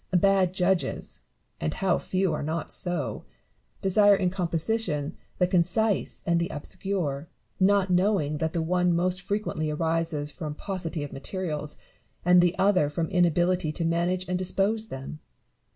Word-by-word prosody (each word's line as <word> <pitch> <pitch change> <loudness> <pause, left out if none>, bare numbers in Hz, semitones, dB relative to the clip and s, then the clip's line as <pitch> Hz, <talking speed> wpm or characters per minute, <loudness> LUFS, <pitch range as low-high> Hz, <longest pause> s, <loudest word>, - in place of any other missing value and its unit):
Bad 195 -1 +3
judges 185 -1 0 0.4
(and 75 - -2
how 190 -2 +1
few 185 -3 0
are - - -2
not 160 +1 -3
so 175 -6 +1 0.3
!) - - -40
desire 205 +1 +5
in 185 -2 0
composition 170 -3 -1 0.2
the 180 - +3
concise 185 +4 0
and 170 0 +2
the 170 - -1
obscure, 165 -2 -3 0.3
not 195 0 +3
knowing 180 -5 +2
that 160 0 -1
the 165 - 0
one 180 +1 +2
most 180 +2 0
frequently 195 -5 -2
arises 160 -1 -1
from 150 -2 -6
paucity 175 -4 -4
of 145 - -7
materials, 150 0 -4 0.5
and 180 0 +7
the 175 +1 +2
other 190 -7 +3
from 160 +2 -2
inability 175 -1 +2
to 165 - -2
manage 175 +2 0
and 180 0 -1
dispose 200 +4 0
them. 135 -1 -7
175 Hz, 150 wpm, -27 LUFS, 160-190 Hz, 0.5 s, and